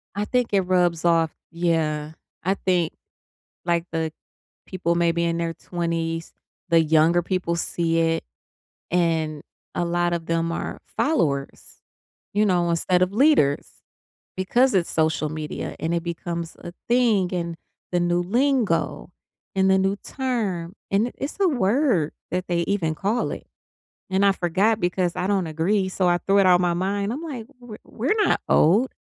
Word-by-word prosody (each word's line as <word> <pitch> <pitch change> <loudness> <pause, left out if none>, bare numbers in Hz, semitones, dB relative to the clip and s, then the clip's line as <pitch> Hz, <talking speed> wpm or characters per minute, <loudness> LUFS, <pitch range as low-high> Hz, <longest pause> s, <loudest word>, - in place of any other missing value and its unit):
I 205 +1 -1
think 250 +1 0
it 195 - +4
rubs 180 -2 +1
off 165 -2 +3 0.2
yeah. 160 -3 0 0.3
I 190 +2 +2
think, 180 -4 0 0.7
like, 170 -1 +1
the 160 -1 -1 0.6
people 175 -3 -1
maybe 170 0 +1
in 170 0 0
their 165 -1 -2
20s, 165 -1 -3 0.4
the 165 -1 +5
younger 160 +2 +3
people 180 -1 -1
see 165 0 0
it, 165 0 +1 0.7
and 160 -4 0 0.3
a 175 - 0
lot 175 0 0
of 165 -1 -3
them 165 0 0
are - - -4 0.2
followers, 145 - -1 0.5
you 210 +1 +2
know, 175 -3 +2
instead 180 +2 +2
of 185 +1 +1
leaders, 225 - +3 0.7
because 240 +7 +2
it's 180 -3 +1
social 155 -1 +1
media, 155 0 -5
and 165 +2 -1
it 170 - 0
becomes 170 0 -5
a 175 - -8 0.2
thing, 230 -7 +3
and 170 -2 -3 0.4
the 175 - +2
new 175 0 +1
lingo, 200 - 0 0.4
and 190 0 +3
the 190 - +5
new 195 +1 +1
term, 205 -10 -3 0.2
and 200 +4 +2
it 245 - -7
it's 280 +7 -5
a 385 - +4
word, 240 - +1 0.2
that 180 +1 -2
they 175 -1 +1
even 165 -6 0
call 210 +8 0
it, - - -7 0.6
and 190 +1 +2
I 200 - +6
forgot 195 +5 +1
because 180 -1 0
I 180 - -1
don't 195 -4 +1
agree, 185 +5 0
so 185 0 0
I 175 0 +3
threw 195 +2 +2
it 195 - +4
out 180 -1 +5
my 175 -1 +2
mind. 200 +3 -1
I'm, 275 +6 -4
like, 275 -9 -6
"We're 240 -4 -10
we're 265 - -1
not - - +2
old, 210 +12 +4
175 Hz, 165 wpm, -24 LUFS, 165-200 Hz, 0.7 s, I